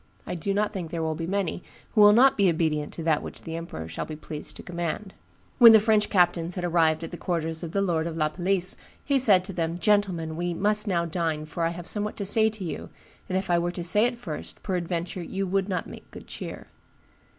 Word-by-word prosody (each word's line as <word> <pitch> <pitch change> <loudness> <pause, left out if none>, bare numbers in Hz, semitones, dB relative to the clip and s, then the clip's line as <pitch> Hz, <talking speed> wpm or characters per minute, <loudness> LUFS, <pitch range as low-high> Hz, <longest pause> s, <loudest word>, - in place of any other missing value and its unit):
I - - -4
do 180 +3 -2
not 210 +1 0
think 180 -5 -4
there 165 0 -3
will 160 0 0
be 165 +1 -4
many 195 -2 -1 0.3
who 215 - +3
will 205 0 +9
not 255 +5 +6
be 200 -3 +4
obedient 155 -3 0
to 165 - -6
that 160 -2 +2
which - - -9
the 165 - -5
emperor 165 - -6
shall - - -4
be 155 - -6
pleased 150 0 -8
to - - -10
command.' 175 +3 -4 0.5
"When 230 -2 +10
the 220 - +8
French 215 -1 +2
captains 175 -2 +2
had 180 - -4
arrived 165 -2 +2
at 165 - -6
the 175 - -6
quarters 165 -2 -2
of 170 -2 -5
the 200 +2 +1
lord 165 -3 0
of 165 -1 -5
La 155 -1 +1
Palisse, 185 +2 0 0.3
he 280 -1 +2
said 195 -7 +5
to 195 - -6
them, 165 0 -2
'Gentlemen, 180 -4 +1
we 175 +1 -2
must 210 +3 +1
now 170 -3 +1
dine, 160 -2 -2
for 165 +2 -4
I - - +2
have 170 0 -7
somewhat 210 +2 -3
to 200 - -3
say 220 +2 +4
to 215 -3 -8
you, 165 - -5 0.4
and 185 - 0
if 190 - -2
I 170 - +4
were 175 +1 -1
to 175 - -5
say 210 +6 +4
it 245 0 -1
first, 170 -11 -7
peradventure 175 -1 -3
you 195 +3 -3
would 195 +1 0
not 180 -3 -2
make - - -12
good - - -11
cheer. - - -7
175 Hz, 240 wpm, -26 LUFS, 165-200 Hz, 0.5 s, When